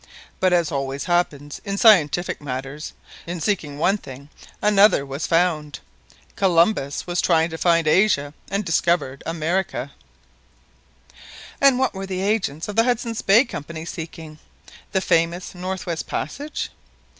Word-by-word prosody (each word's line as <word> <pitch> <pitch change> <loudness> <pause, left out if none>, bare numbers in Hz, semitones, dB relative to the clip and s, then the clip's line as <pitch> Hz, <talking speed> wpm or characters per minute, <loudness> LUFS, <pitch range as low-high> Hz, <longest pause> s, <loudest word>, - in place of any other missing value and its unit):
But 185 -1 +3
as 170 -3 +2
always 135 -1 -3
happens 150 -5 -1
in 200 -1 -3
scientific 175 -7 +4
matters, 135 +2 -6 0.3
in 175 0 -4
seeking 160 -5 -2
one 195 +7 +2
thing, 135 -1 -11 0.3
another 205 -7 +4
was 140 +3 -4
found. 165 -4 +1 0.6
Columbus 170 -5 +2
was 175 0 -1
trying 165 -1 +2
to 160 - -5
find 170 -2 +3
Asia, 150 -5 +3 0.2
and 200 +1 -1
discovered 165 -5 0
America." 165 -4 -2 1.7
"And 275 -2 +6
what 260 -1 +1
were 195 0 -6
the 185 -1 -3
agents 195 -7 -1
of 205 - -5
the 225 - +6
Hudson's 235 -2 -1
Bay 220 +7 +5
Company 160 - -7
seeking? 160 -2 -8 0.5
The 190 - +1
famous 170 0 0
North 185 +1 -5
West 170 -2 -4
Passage?" 285 - -4
170 Hz, 135 wpm, -22 LUFS, 150-195 Hz, 1.7 s, And